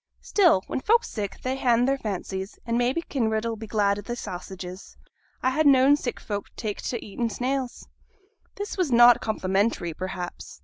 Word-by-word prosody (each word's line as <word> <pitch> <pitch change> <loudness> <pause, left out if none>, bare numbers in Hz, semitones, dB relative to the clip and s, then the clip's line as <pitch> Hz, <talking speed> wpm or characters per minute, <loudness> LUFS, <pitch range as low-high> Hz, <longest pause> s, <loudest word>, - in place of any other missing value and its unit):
'Still, 345 - +3
when - - -3
folk's 460 - +2
sick 205 -3 -4
they 255 +1 -1
han 245 -2 +3
their 270 +1 +2
fancies, 195 -4 -5
and 230 - -1
maybe 250 +7 +1
Kinraid 220 -6 -1
'll 230 -1 -1
be 220 0 -8
glad 205 -2 +1
o' - - -5
thy 240 +4 -5
sausages. 185 -2 -8 0.5
I 260 - +3
ha' 305 +4 +2
known 275 -1 +6
sick 260 -4 -4
folk 205 -1 -4
tak' 210 -3 -4
t' 245 - -2
eating 230 +2 -3
snails.' 255 +3 -3 0.7
This 410 0 -5
was 360 -7 0
not 240 0 +7
complimentary, 195 -4 0
perhaps. 185 0 -6
230 Hz, 175 wpm, -26 LUFS, 200-260 Hz, 0.7 s, not